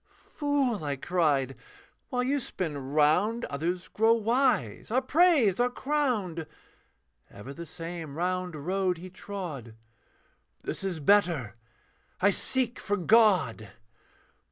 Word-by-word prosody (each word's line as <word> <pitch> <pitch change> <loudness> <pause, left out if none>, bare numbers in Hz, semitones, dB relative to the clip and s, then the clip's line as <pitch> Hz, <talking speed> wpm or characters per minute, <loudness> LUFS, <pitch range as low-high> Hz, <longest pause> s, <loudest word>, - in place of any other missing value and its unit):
'Fool,' 275 - -2
I 145 -1 -1
cried, 140 -4 0 0.5
'while 250 -1 0
you 280 +3 +1
spin 180 - -4
round, 155 - +1
'Others 175 +6 -2
grow 225 +2 +3
wise, 230 - +1
are 245 +4 +2
praised, 265 - +3
are 245 - +3
crowned.' 245 - -1 0.8
Ever 125 +7 -10
the 170 +2 -8
same 165 -3 -7
round 180 0 -2
road 180 +4 -1
he 180 +2 -10
trod, 170 - -7 0.9
'This - - -4
is 185 -4 -2
better: 170 - +2 0.6
I 200 +2 +4
seek 250 +4 0
for 205 0 -1
God.' 185 - +3
185 Hz, 115 wpm, -28 LUFS, 155-235 Hz, 0.9 s, I